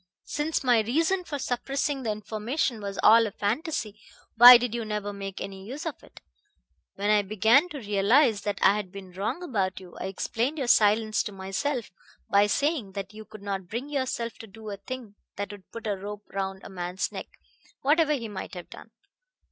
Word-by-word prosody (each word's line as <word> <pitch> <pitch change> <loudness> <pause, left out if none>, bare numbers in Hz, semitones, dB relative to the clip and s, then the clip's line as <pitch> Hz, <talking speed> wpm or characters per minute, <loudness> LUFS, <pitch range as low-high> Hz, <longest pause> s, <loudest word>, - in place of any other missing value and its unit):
"Since 300 +1 -1
my 245 -3 +4
reason 320 - +1
for 290 - -4
suppressing 275 +2 -2
that 225 -4 -1
information 215 +4 -2
was 200 -1 -5
all 225 +1 +7
a - - -6
fantasy, 215 - -2 0.4
why 245 +2 +12
did 240 -1 -3
you 235 -1 -2
never 210 -1 -3
make 195 -1 -6
any 195 -1 -7
use 270 - -7
of 325 - -5
it? - - -16 0.7
When 205 +2 0
I 210 -1 +5
began 220 - +3
to 305 - -7
realize 210 +1 +3
that 205 -1 -2
I - - +7
had 195 -4 -5
been 195 -2 -10
wrong 200 - -3
about 195 - -1
you, 180 -2 -13
I - - -4
explained 235 +9 -2
your 275 - -1
silence 215 -1 +4
to 210 - -5
myself 195 +7 -3 0.4
by 200 +1 +5
saying 280 - 0
that 200 +1 -6
you 215 0 -10
could 210 -1 -12
not 195 -2 -4
bring 240 +8 -5
yourself 260 -5 -2
to 225 - -9
do 215 +1 -9
a 200 - -5
thing 215 0 -8 0.2
that 200 0 -4
would 205 -2 -12
put 230 0 -9
a 205 -2 0
rope 205 +2 -7
round 195 -1 -3
a - - -9
man's 180 0 -3
neck, - - -6 0.5
whatever 305 +2 +3
he 240 -6 -3
might 195 -2 -7
have 180 - -9
done. - - -11
215 Hz, 195 wpm, -27 LUFS, 200-255 Hz, 0.7 s, why